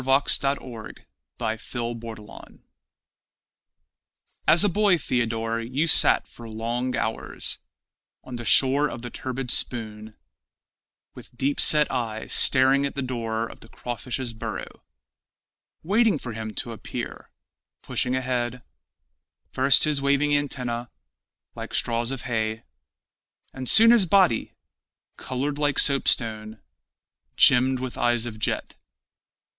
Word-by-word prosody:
Theodore 135 -3 0 0.4
the 110 -2 -3
Poet 115 -3 -7 2.0
As 170 +4 +5
a - - +4
boy, 200 -1 +2
Theodore, 115 -4 -2
you 130 +7 -1
sat 165 - +4
for 115 -1 -12
long 120 +3 -3
hours 110 - -4 0.6
On 130 - -8
the 120 - -6
shore 135 +5 +4
of 115 - -8
the 120 - -7
turbid 130 -1 -4
Spoon 110 -2 -3 1.0
With 120 - -15
deep 140 +3 0
set 150 -1 +5
eye 115 -4 -3
staring 135 +1 +5
at 140 - -3
the 140 - -3
door 115 -3 -3
of - - -12
the - - -14
crawfish's 120 0 -5
burrow, 110 - -7 1.0
Waiting 210 +1 +2
for 125 -4 -7
him 110 -1 -7
to 120 - -5
appear, 115 - -7 0.5
pushing 125 0 -2
ahead, 125 -1 -3 0.9
First 135 +1 +4
his 150 -3 +1
waving 140 +1 +1
antennæ, 125 -5 -2 0.6
like - - -7
straws 115 0 -1
of 135 -1 -4
hay, 110 -2 -3 0.9
And 130 -1 -3
soon 230 +1 +8
his 225 -6 +4
body, 180 - +2 0.6
colored 140 +3 -4
like 145 -2 0
soap 140 -1 +4
stone, 110 -2 0 0.8
Gemmed 130 +1 +4
with 130 -1 -6
eyes 120 -1 +1
of 110 -2 -7
jet. - - -2
125 Hz, 120 wpm, -24 LUFS, 115-140 Hz, 2.0 s, soon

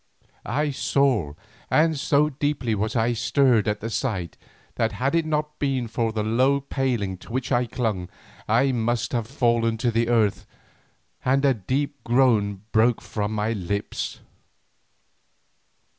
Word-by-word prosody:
I 145 +6 0
saw, 130 - +1 0.4
and 160 +1 +3
so 145 +1 +2
deeply 140 -4 -1
was 110 +3 -2
I 115 +1 +2
stirred 120 -1 +2
at 105 0 -1
the 115 - -3
sight, 95 - -2 0.4
that 115 0 0
had 135 +4 -1
it 165 -1 +1
not 150 -1 -2
been 135 -4 0
for 115 0 -1
the 110 -1 -2
low 130 +6 +2
paling 125 -8 -2
to - - -13
which 130 +2 -3
I 120 -1 +2
clung, 105 -7 -2 0.4
I 135 0 +3
must 120 -1 -1
have 115 -3 -1
fallen 115 -3 +1
to 120 +1 0
the 115 +1 +1
earth, 110 -4 +1 0.8
and 135 +2 +2
a 135 - +5
deep 135 +7 -3
groan 110 -6 +2
broke 115 +1 +3
from 105 -1 -3
my 110 +1 0
lips. 100 0 -4
120 Hz, 145 wpm, -24 LUFS, 110-135 Hz, 0.8 s, a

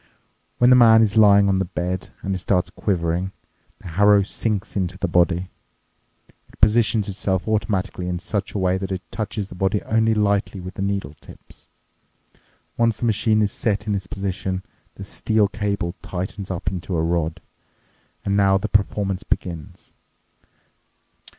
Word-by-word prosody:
When 125 +1 +5
the - - +8
man 115 -2 +7
is 105 -1 0
lying 100 -2 +6
on 95 -1 +2
the 95 - 0
bed 90 +1 -4
and 95 - -1
it 95 - -2
starts 90 0 0
quivering, 90 -1 -1 0.4
the - - -10
harrow 100 +4 +5
sinks 105 0 -3
onto 95 -2 -2
the 95 - -1
body. 90 +1 +1 1.0
It - - -21
positions 110 -1 +3
itself 95 -1 -2
automatically 100 -4 -1
in 90 0 -2
such 100 +2 -3
a - - +1
way 95 -1 +1
that 95 0 -4
it 95 -1 -3
touches 105 -2 -3
the - - -9
body 95 +3 0
only 110 0 +2
lightly 100 -1 0
with 90 +1 -7
the - - -6
needle 100 -7 -2
tips. - - -16 1.1
Once 115 -2 +2
the 120 - -3
machine 110 -1 +2
is 105 - 0
set 105 -2 -1
in 105 - -1
this 95 -1 -3
position, 95 -1 -3 0.3
this 95 - -9
steel 110 -1 +1
cable 100 -3 -2
tightens 95 +2 -5
up 95 -3 -5
into 90 0 -4
a 80 - +1
rod. 80 -1 -1 0.9
And 100 - +1
now 100 -1 +4
the 95 - -3
performance 100 -2 0
begins. 85 -4 -5
100 Hz, 165 wpm, -22 LUFS, 90-105 Hz, 1.1 s, the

